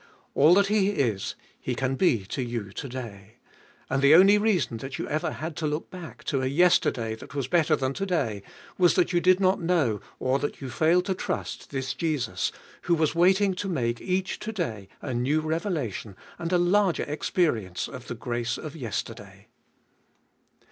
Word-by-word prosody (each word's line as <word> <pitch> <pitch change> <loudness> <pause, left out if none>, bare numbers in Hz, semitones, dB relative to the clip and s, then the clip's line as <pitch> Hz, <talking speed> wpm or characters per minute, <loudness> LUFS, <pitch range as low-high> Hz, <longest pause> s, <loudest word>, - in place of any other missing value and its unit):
All 155 +5 +6
that 200 +1 +5
He 200 -1 +2
is, 120 - -1 0.2
He 125 - -3
can 135 +1 -1
be 125 - +2
to 130 - -4
you 120 -5 -4
to 135 +7 -6
day. 110 -4 -8 0.5
And 135 +1 0
the 140 +3 +7
only 195 +4 +7
reason 180 - +1
that 135 +4 -6
you - - -4
ever 155 +1 -1
had 160 0 -5
to 155 - -1
look 150 +2 -3
back 180 -3 -9
to 135 -3 -1
a 130 - 0
yesterday 135 -7 +3
that 130 +5 -11
was 135 -4 -1
better 160 0 +3
than 135 -2 -1
to 195 +6 -3
day, 125 - -1 0.4
was 175 -1 +5
that 180 -1 +2
you 175 - +3
did 185 +1 +5
not 190 0 +2
know, 160 - +1 0.2
or 130 +1 +1
that 145 - -3
you 135 -3 -6
failed 170 +6 +3
to 190 - 0
trust, 185 - -4
this 130 -1 -3
Jesus, 155 -6 -1 0.3
who 175 - +2
was 155 -2 +1
waiting 190 +3 +4
to 195 +2 -4
make 120 -8 -1
each 185 0 -1
to 220 - -4
day 115 - -4 0.2
a 130 - -3
new 130 +6 +1
revelation 155 - -3 0.2
and 170 0 -3
a 180 - +4
larger 180 +1 +2
experience 145 - -1
of 125 -3 -10
the 120 - -4
grace 120 +1 -2
of 155 -1 -7
yesterday. 120 - -6
150 Hz, 190 wpm, -26 LUFS, 125-180 Hz, 0.5 s, the